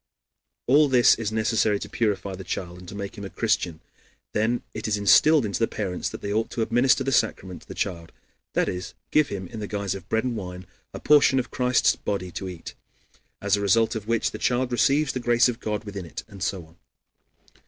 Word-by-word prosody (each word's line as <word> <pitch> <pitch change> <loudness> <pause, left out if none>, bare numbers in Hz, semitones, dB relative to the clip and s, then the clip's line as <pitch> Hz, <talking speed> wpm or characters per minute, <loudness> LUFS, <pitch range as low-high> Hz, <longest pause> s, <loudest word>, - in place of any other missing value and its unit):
All 145 +4 +5
this 125 -3 +6
is 110 -2 -2
necessary 110 -1 +1
to - - -7
purify 100 -3 -1
the 95 +1 -7
child 90 -1 -5
and 90 -1 -11
to - - -8
make 100 +1 -6
him - - -7
a 100 - -5
Christian. 90 -8 -1 0.5
Then 110 +3 0
it 110 - -4
is 105 -1 +1
instilled 125 - +5
into 100 - -2
the 115 - +2
parents 95 -4 -3
that - - -8
they 100 - -2
ought 110 +1 0
to 115 - -1
administer 130 +4 +3
the 135 - -1
sacrament 95 -7 0
to - - -19
the - - -8
child, 85 -4 -3 0.4
that - - +1
is, 90 0 -5 0.2
give 155 -1 +4
him, 95 -2 -5
in 115 - -7
the 105 - -4
guise 100 -2 -2
of 95 - -9
bread 110 0 +1
and 125 -2 -2
wine, 90 -3 -7 0.3
a - - -7
portion 145 -2 +5
of 125 -1 -1
Christ's 125 -1 +2
body 90 -3 -4
to 95 +2 -5
eat, 90 -2 -9 0.7
as 100 -1 +3
a 100 - -3
result 110 +3 +3
of 110 -2 -5
which 115 -1 +1
the 110 - -7
child 125 +3 0
receives 140 +5 +2
the 130 - -2
grace 120 0 +4
of 120 -1 -3
God 105 -1 -3
within 100 -4 -7
it, - - -7
and 100 -3 -13
so 90 -1 -2
on. 80 +2 -22
105 Hz, 225 wpm, -25 LUFS, 95-120 Hz, 0.7 s, this